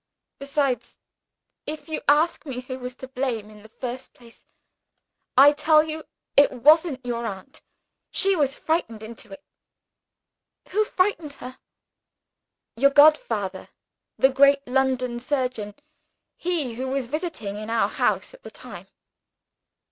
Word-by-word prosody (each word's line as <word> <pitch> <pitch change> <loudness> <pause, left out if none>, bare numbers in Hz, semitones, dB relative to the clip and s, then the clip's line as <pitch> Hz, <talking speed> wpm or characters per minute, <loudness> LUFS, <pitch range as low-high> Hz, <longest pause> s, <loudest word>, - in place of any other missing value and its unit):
Besides, 275 -2 -2 0.7
if 310 +2 -6
you 315 - -4
ask 305 +4 +3
me 260 -4 -5
who 255 0 -7
was 250 0 -7
to 260 - -9
blame 250 -5 -3
in 210 -1 -15
the 220 - -16
first 250 +2 -7
place, 235 -2 -19 0.9
I 280 +2 +9
tell 305 +1 +4
you 315 0 -6 0.3
it 285 - +6
wasn't 285 +1 +3
your 235 -1 -2
aunt; 195 +5 -8 0.5
she 390 0 +2
was 285 -4 +1
frightened 230 -10 -2
into 225 +1 -10
it." 290 0 -11 1.3
"Who 425 +3 +1
frightened 365 -7 0
her?" 255 -1 -10 1.2
"Your 275 +4 +4
godfather 235 -10 +3 0.5
the 265 - +5
great 275 +1 +4
London 255 -2 0
surgeon 250 -6 -3 0.6
he 330 -9 -2
who 255 +3 -4
was 265 -1 -2
visiting 265 - -4
in 215 +1 -7
our 230 0 +2
house - - -1
at - - -16
the - - -10
time." - - -11
265 Hz, 135 wpm, -24 LUFS, 240-300 Hz, 1.3 s, I